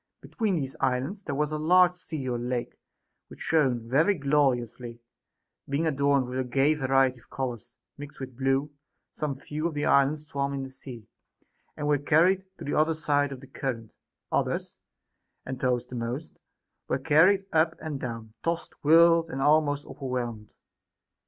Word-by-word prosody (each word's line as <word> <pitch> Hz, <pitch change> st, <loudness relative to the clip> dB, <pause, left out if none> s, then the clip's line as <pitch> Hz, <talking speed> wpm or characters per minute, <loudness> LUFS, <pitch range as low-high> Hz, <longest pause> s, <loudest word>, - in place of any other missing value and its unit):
Be -, -, -14 dB
tween 215 Hz, -6 st, 0 dB
these 135 Hz, -5 st, -3 dB
islands 135 Hz, +10 st, -1 dB
there 145 Hz, -8 st, -4 dB
was 150 Hz, +1 st, 0 dB
a 155 Hz, -, -2 dB
large 180 Hz, +3 st, +5 dB
sea 160 Hz, -6 st, -6 dB
or 120 Hz, -1 st, -1 dB
lake 120 Hz, 0 st, -3 dB, 0.5 s
which -, -, -14 dB
shone 130 Hz, -8 st, +1 dB
very 155 Hz, -, +3 dB
gloriously, 125 Hz, -5 st, 0 dB, 0.7 s
being 140 Hz, +4 st, 0 dB
adorned 140 Hz, -3 st, +2 dB
with 125 Hz, +1 st, -4 dB
a -, -, +1 dB
gay 135 Hz, +4 st, +2 dB
variety 135 Hz, -3 st, +2 dB
of -, -, -21 dB
colors 120 Hz, -2 st, -5 dB, 0.2 s
mixed 145 Hz, 0 st, -9 dB
with 130 Hz, -2 st, -7 dB
blue; 135 Hz, +3 st, 0 dB, 0.4 s
some 150 Hz, -3 st, -3 dB
few 150 Hz, +4 st, -3 dB
of 165 Hz, -, -6 dB
the 145 Hz, -, -1 dB
islands 145 Hz, +2 st, +3 dB
swam 140 Hz, -1 st, -2 dB
in 135 Hz, -, -3 dB
this 135 Hz, 0 st, -9 dB
sea, 120 Hz, -6 st, -10 dB, 0.7 s
and 150 Hz, -, -2 dB
were 145 Hz, -1 st, +3 dB
carried 175 Hz, +6 st, +3 dB
to -, -, -8 dB
the 145 Hz, -, -2 dB
other 155 Hz, +1 st, +2 dB
side 145 Hz, -2 st, +1 dB
of 130 Hz, -2 st, -8 dB
the 135 Hz, -, -12 dB
current; 125 Hz, -5 st, -5 dB, 0.4 s
others, -, -, -1 dB, 0.7 s
and 130 Hz, -1 st, -5 dB
those 125 Hz, -2 st, 0 dB
the 125 Hz, -, -9 dB
most, 120 Hz, +6 st, -5 dB, 0.5 s
were -, -, 0 dB
carried 165 Hz, +8 st, +4 dB
up 160 Hz, +1 st, +3 dB
and 150 Hz, -3 st, -5 dB
down, 115 Hz, -3 st, -6 dB
tossed, 170 Hz, 0 st, -2 dB
whirled, 165 Hz, +2 st, +6 dB
and 135 Hz, -, -5 dB
almost 145 Hz, 0 st, +3 dB
overwhelmed. 120 Hz, -5 st, -5 dB
140 Hz, 170 wpm, -27 LUFS, 130-155 Hz, 0.7 s, whirled